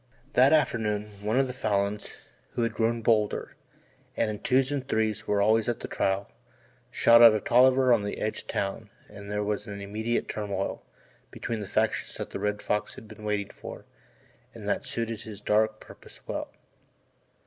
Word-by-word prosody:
That 130 Hz, +2 st, +6 dB
afternoon 105 Hz, -8 st, +1 dB
one 110 Hz, +4 st, +1 dB
of 135 Hz, -, +3 dB
the 125 Hz, -, -5 dB
Falins, 105 Hz, -3 st, -2 dB, 0.3 s
who 120 Hz, -, 0 dB
had 115 Hz, -, 0 dB
grown 115 Hz, 0 st, 0 dB
bolder, 105 Hz, -2 st, +1 dB, 0.7 s
and 110 Hz, -, +1 dB
in 105 Hz, -, -6 dB
twos 130 Hz, +2 st, +2 dB
and 135 Hz, -2 st, -3 dB
threes 110 Hz, -1 st, -1 dB
were 100 Hz, -1 st, +2 dB
always 110 Hz, +2 st, +3 dB
at 120 Hz, -, -2 dB
the -, -, -5 dB
trial, 95 Hz, +1 st, -1 dB, 0.6 s
shot 115 Hz, 0 st, +6 dB
at 115 Hz, -2 st, +9 dB
a -, -, +1 dB
Tolliver 130 Hz, +3 st, +5 dB
on 115 Hz, -, +3 dB
the 100 Hz, 0 st, -4 dB
edge 110 Hz, -, -2 dB
of -, -, -11 dB
town 100 Hz, +2 st, -3 dB, 0.2 s
and 100 Hz, -1 st, -10 dB
there 105 Hz, 0 st, -1 dB
was 105 Hz, +1 st, -2 dB
an 100 Hz, -1 st, -6 dB
immediate 110 Hz, +4 st, -2 dB
turmoil 100 Hz, -2 st, -3 dB, 0.5 s
between 115 Hz, -2 st, -4 dB
the 105 Hz, -, -5 dB
factions -, -, 0 dB
that -, -, -6 dB
the -, -, -4 dB
Red 105 Hz, +1 st, -2 dB
Fox 105 Hz, -, -1 dB
had 110 Hz, -, -12 dB
been 110 Hz, -, -12 dB
waiting 105 Hz, -1 st, -1 dB
for -, -, -10 dB, 0.7 s
and -, -, -8 dB
that -, -, -1 dB
suited 115 Hz, -1 st, -3 dB
his 105 Hz, -3 st, -9 dB
dark 110 Hz, +1 st, +1 dB
purposes -, -, -14 dB
well. -, -, -4 dB
110 Hz, 180 wpm, -27 LUFS, 105-115 Hz, 0.7 s, at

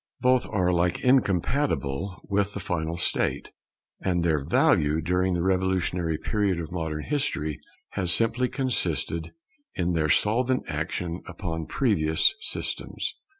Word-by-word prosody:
Both 125 Hz, 0 st, +3 dB
are 95 Hz, -4 st, +1 dB
alike 90 Hz, 0 st, +1 dB
incompatible 100 Hz, -, +1 dB
with 100 Hz, 0 st, -1 dB
the -, -, -3 dB
final 85 Hz, -2 st, -2 dB
state; -, -, 0 dB, 0.5 s
and 90 Hz, -2 st, 0 dB
their 80 Hz, -4 st, +1 dB
value 75 Hz, 0 st, +3 dB
during 90 Hz, +2 st, +1 dB
the 85 Hz, -, 0 dB
revolutionary 90 Hz, -3 st, +1 dB
period 100 Hz, -3 st, 0 dB
of 80 Hz, -1 st, -6 dB
modern 80 Hz, -3 st, -3 dB
history 80 Hz, -, -1 dB, 0.3 s
has 90 Hz, -4 st, 0 dB
simply 115 Hz, +5 st, +2 dB
consisted 85 Hz, -, -1 dB, 0.4 s
in 90 Hz, -3 st, 0 dB
their 80 Hz, -2 st, +1 dB
solvent 125 Hz, -, +2 dB
action 85 Hz, 0 st, -3 dB
upon 80 Hz, -4 st, -4 dB
previous 85 Hz, -, +3 dB
systems. -, -, -3 dB
90 Hz, 125 wpm, -26 LUFS, 80-105 Hz, 0.5 s, Both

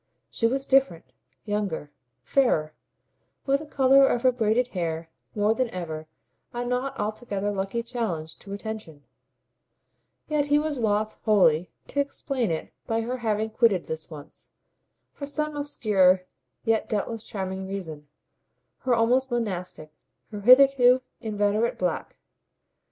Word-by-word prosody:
She 230 Hz, -, +1 dB
was 270 Hz, +3 st, -1 dB
different, 270 Hz, -12 st, +2 dB, 0.3 s
younger, 205 Hz, -8 st, -2 dB, 0.3 s
fairer, 155 Hz, -, +2 dB, 0.7 s
with 275 Hz, 0 st, +2 dB
the 310 Hz, -, -9 dB
colour 270 Hz, -1 st, +5 dB
of 240 Hz, -, 0 dB
her 255 Hz, -, +6 dB
braided 240 Hz, +1 st, +1 dB
hair 165 Hz, -4 st, -3 dB, 0.2 s
more 210 Hz, +1 st, +3 dB
than 255 Hz, +1 st, -1 dB
ever 160 Hz, -4 st, -6 dB, 0.5 s
a 240 Hz, 0 st, -3 dB
not 250 Hz, +2 st, -2 dB
altogether 205 Hz, -1 st, -2 dB
lucky 195 Hz, +4 st, -2 dB
challenge 205 Hz, -10 st, -4 dB
to 195 Hz, -, -11 dB
attention; 200 Hz, -8 st, -7 dB, 1.2 s
yet 300 Hz, -2 st, 0 dB
he 290 Hz, 0 st, +4 dB
was 300 Hz, -2 st, -1 dB
loth 215 Hz, -1 st, 0 dB
wholly 180 Hz, -6 st, +4 dB, 0.2 s
to 285 Hz, -, -2 dB
explain 275 Hz, -3 st, -1 dB
it 160 Hz, -1 st, -4 dB
by 225 Hz, 0 st, 0 dB
her 245 Hz, +3 st, -3 dB
having 220 Hz, -2 st, -1 dB
quitted 220 Hz, -5 st, +2 dB
this 160 Hz, 0 st, -6 dB
once, 150 Hz, -1 st, -11 dB, 0.6 s
for 280 Hz, -, -7 dB
some 300 Hz, +1 st, -2 dB
obscure 205 Hz, -10 st, +3 dB, 0.4 s
yet 225 Hz, -1 st, +1 dB
doubtless 220 Hz, +1 st, -2 dB
charming 190 Hz, -2 st, -5 dB
reason, 160 Hz, -7 st, -6 dB, 0.7 s
her 255 Hz, -2 st, +1 dB
almost 250 Hz, +4 st, +2 dB
monastic, 185 Hz, -9 st, -3 dB, 0.4 s
her 210 Hz, -1 st, -6 dB
hitherto 255 Hz, +1 st, +6 dB, 0.2 s
inveterate 210 Hz, 0 st, 0 dB
black. 180 Hz, -2 st, -3 dB
220 Hz, 130 wpm, -26 LUFS, 190-255 Hz, 1.2 s, her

